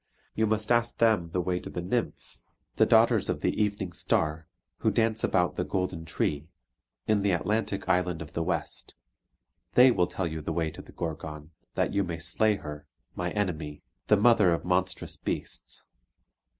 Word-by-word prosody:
You 110 0 +1
must 110 +1 0
ask 120 0 +2
them 110 -7 +3
the 90 +2 -1
way 90 0 -1
to - - -8
the - - -5
Nymphs, 105 +7 -3 0.3
the - - +5
daughters - - +4
of - - -1
the - - 0
Evening 100 -4 -1
Star, 80 0 0 0.3
who - - +2
dance 110 0 +1
about 90 -1 +1
the 90 - +1
golden 90 -3 -2
tree, 75 -2 -1 0.6
in 110 -2 +2
the 100 - +2
Atlantic 105 +3 -1
island 90 -2 +1
of 75 -2 -8
the 85 - -1
west. 80 - -3 0.8
They 125 +1 +8
will 90 -6 +2
tell 95 - -3
you 80 -1 -4
the 80 +2 -3
way 80 -1 0
to - - -10
the - - -15
Gorgon, 80 -2 -6 0.2
that - - 0
you 100 - +2
may 85 -3 -4
slay 90 +6 +1
her, 75 -4 -8 0.3
my 90 0 -2
enemy, 80 -8 -3 0.2
the 105 - +5
mother 105 -4 +5
of - - -7
monstrous 90 +1 0
beasts. - - -4
90 Hz, 175 wpm, -28 LUFS, 80-105 Hz, 0.8 s, They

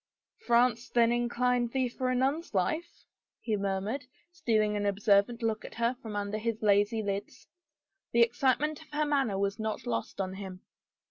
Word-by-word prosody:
" - - -63
France 235 -1 +3
then 235 -1 +4
inclined 240 0 +1
thee 260 -1 +1
for 255 +1 -2
a 255 - +1
nun's 275 - 0
life? 315 - -1 0.2
" - - -64
he 220 - +2
mur 195 -1 -1
mured, 240 +7 -4 0.3
stealing 215 -11 +1
an 205 - -1
observant 205 +3 +2
look 220 -1 -1
at - - -9
her 235 +2 +1
from 220 -4 -6
under 205 +1 -2
his 225 0 -3
lazy 205 +2 +3
lids. 200 0 -4 0.6
The 235 0 +6
excitement 270 +6 +1
of 315 - -16
her 300 +1 +1
manner 275 -9 +1
was 200 +1 -1
not 220 0 -3
lost 115 +7 -3
on 190 -1 -2
him. 190 -1 -8
230 Hz, 185 wpm, -30 LUFS, 205-250 Hz, 0.6 s, The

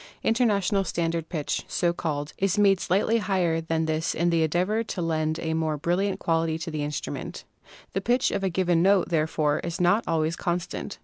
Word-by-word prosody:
"International 205 -4 +2
Standard 165 -2 -2
Pitch," 155 -5 -2
so 170 -1 0
called, 150 -3 -3
is 195 0 +1
made 195 -2 +4
slightly 205 +6 +1
higher 180 -5 0
than 160 0 -1
this 160 +1 -1
in 170 +1 +1
the 165 -1 +2
endeavor 180 +8 +1
to 215 - -6
lend 160 -2 0
a 160 -1 -2
more 160 -1 0
brilliant 185 +5 0
quality 165 -1 0
to 165 0 -5
the 155 -1 -3
instruments. 145 0 -5 0.5
The 195 - -1
pitch 240 +5 +2
of 195 - -2
a 190 - +2
given 175 -2 +1
note, 195 0 +3
therefore, 155 -2 +1
is 170 -1 -4
not 180 +5 +3
always 160 0 0
constant. 175 0 -3
170 Hz, 185 wpm, -26 LUFS, 160-195 Hz, 0.5 s, made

